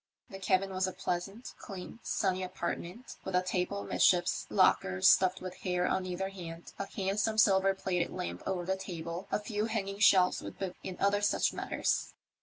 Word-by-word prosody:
The 195 - -7
cabin 195 0 +1
was 185 0 +1
a 185 - -4
pleasant, 195 +5 -4
clean, 195 +2 -8
sunny 190 -2 0
apartment, 185 +4 -5
with 190 - -3
a 180 - +3
table 185 +2 -1
amidships, 175 -1 +2
lockers 95 0 +3
stuffed 185 0 +5
with 185 0 -7
hair 180 -1 0
on 185 0 0
either 185 +2 -2
hand, 170 -3 -9
a 200 - -3
handsome 205 +3 -1
silver 195 -2 +5
plated 180 -3 -1
lamp 85 +1 -5
over 180 -2 -1
the 190 +1 0
table, 175 -1 -6
a - - +1
few 210 0 -2
hanging 200 -3 -3
shelves 185 -3 +5
with - - -8
books 190 -2 -5
and 185 - -6
other 200 +1 +2
such 205 - +2
matters. - - -1
190 Hz, 180 wpm, -31 LUFS, 180-195 Hz, -, stuffed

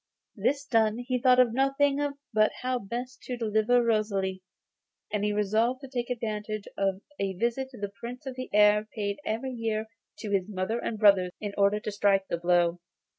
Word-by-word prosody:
This 285 0 0
done, 225 -4 +2
he 250 +1 -2
thought 255 -1 +5
of 245 -3 +5
nothing 275 +2 +2 0.3
but 215 0 +4
how 255 0 0
best 245 +5 -6
to 250 - -4
deliver 225 +2 +2
Rosalie, 200 -4 0 0.7
and 210 -1 0
he 210 - +1
resolved 220 +5 +1
to 270 - -8
take 245 -2 -3
advantage 215 -3 -3
of 195 -1 0 0.2
a 195 -1 -1
visit 235 +7 -1
which 245 - -12
the 205 -1 -3
Prince 245 +4 -7
of 265 - -4
the 255 0 -6
Air 210 0 +5
paid 200 -2 -2
every 230 +5 -2
year 225 -2 -2 0.3
to 210 - -6
his 195 0 0
mother 205 +4 -2
and 230 - -3
brothers 195 -4 +5
in 205 -1 -4
order 200 +1 +3
to 210 - -4
strike 195 -1 +2
the 170 - 0
blow. 175 0 +2
215 Hz, 185 wpm, -28 LUFS, 200-245 Hz, 0.7 s, thought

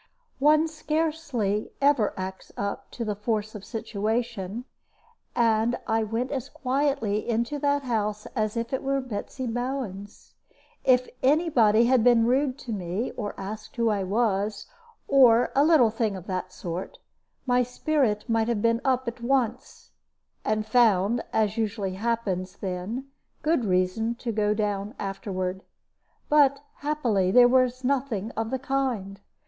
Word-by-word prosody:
One 305 +3 +5
scarcely 305 -9 -2
ever 275 -7 +3
acts 190 0 -6
up 200 0 -4
to 235 - -5
the 210 - -1
force 210 +1 -2
of 210 -3 -8
situation; 220 0 -3 0.7
and 230 0 +2
I 225 0 +1
went 225 +4 -2
as 270 -1 -3
quietly 260 -6 -1
into 235 +5 0
that 285 0 +1
house 215 -3 -1
as 215 -1 -1
if 230 +2 -3
it 265 - 0
were 275 0 0
Betsy 255 +1 -5
Bowen's. 240 -5 -5 0.5
If 250 -1 +4
any 310 +6 +3
body 225 -3 +5
had 250 -1 +4
been 235 -2 +5
rude 260 +2 +1
to 240 - -4
me, 190 +4 -3
or 210 -3 -5
asked 215 +6 -7
who 230 -2 +2
I 205 -2 0
was, 205 0 0 0.4
or 245 -4 +5
a 280 - +5
little 295 -8 +5
thing 220 -2 -1
of 185 -2 -8
that 185 -1 -4
sort, 175 0 -6 0.5
my 250 -1 +3
spirit 250 -3 0
might 225 -1 +1
have 235 -3 0
been 230 0 +2
up 260 -2 +1
at 235 0 -5
once, 245 -1 -1 0.5
and 215 0 0
found, 220 -1 +3
as 215 0 +1
usually 205 -3 -1
happens 195 -3 -2
then, 195 +7 -4 0.4
good 305 -6 +2
reason 185 +5 +1
to 235 0 -4
go 210 -1 +1
down 205 +1 -2
afterward. 190 -1 -3 0.7
But 280 -2 +4 0.2
happily 245 -11 0
there 245 +5 +7
was 255 0 +2
nothing 250 -5 -1
of 225 0 -3
the 265 - -1
kind. 250 -8 -2
230 Hz, 145 wpm, -26 LUFS, 205-260 Hz, 0.7 s, there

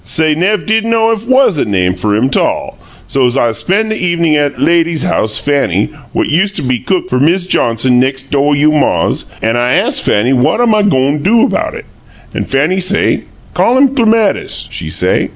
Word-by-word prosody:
Say 155 +9 +1
nev' 190 +7 -1
did 220 0 +1
know 225 0 +1
if 225 +1 -4
WAS 260 - +3
a - - 0
name 90 -3 0
fer 105 +3 0
him 125 +5 0
'tall. - - -1 0.3
So 135 -2 +1
I'z 120 -2 0
spen' 210 - 0
the 220 - -2
evenin' 170 -3 +1
at 145 -1 0
'at - - -14
lady's 170 -2 +1
house, 110 0 +1
Fanny, 135 -10 -1 0.2
what - - -1
used 195 +6 0
to - - -2
be 125 -2 -1
cook 185 +5 -2
fer 125 - -1
Miz 175 +6 +1
Johnson, 125 -6 +1
nex' 135 +1 -1
do' 145 +1 0
you' 150 +2 +2
maw's; 150 -2 0 0.2
an' 115 +2 0
I 120 +1 0
ast - - 0
Fanny 115 +6 +1
what 125 - +1
am 240 -2 +2
I 215 - +2
go'n' 140 -7 +1
a - - -6
do 225 +9 +2
about 270 - -2
it, - - -9 0.5
an' - - -3
Fanny 150 +8 0
say, 190 +2 +1 0.3
'Call 245 +2 +1
him 275 0 +4
Clematis,' 225 -5 0
she - - -6
say. - - -1
150 Hz, 205 wpm, -12 LUFS, 130-205 Hz, 0.5 s, him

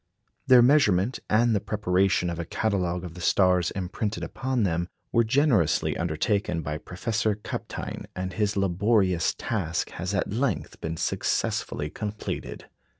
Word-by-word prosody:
Their 125 -2 +8
measurement, 120 -5 +3
and 115 +2 +3
the 105 - +2
preparation 95 -3 +1
of 85 - -5
a 85 - -3
catalogue 90 -3 -1
of 90 -3 -7
the 90 - -10
stars 90 -1 +3
imprinted 100 +3 -3
upon 130 -3 -1
them, 85 -1 0 0.2
were 115 - +4
generously 115 - +2
undertaken 85 +1 -1
by 75 +1 -3
Professor 110 +4 -1
Kapteyn, 105 - -6
and 95 0 -4
his 105 +1 0
laborious 95 -1 +2
task 90 -7 -2
has 95 +3 -3
at 100 - -1
length 125 -1 -2
been 80 +1 -3
successfully 75 -1 -1
completed. 105 0 -5
95 Hz, 140 wpm, -26 LUFS, 90-110 Hz, 0.2 s, Their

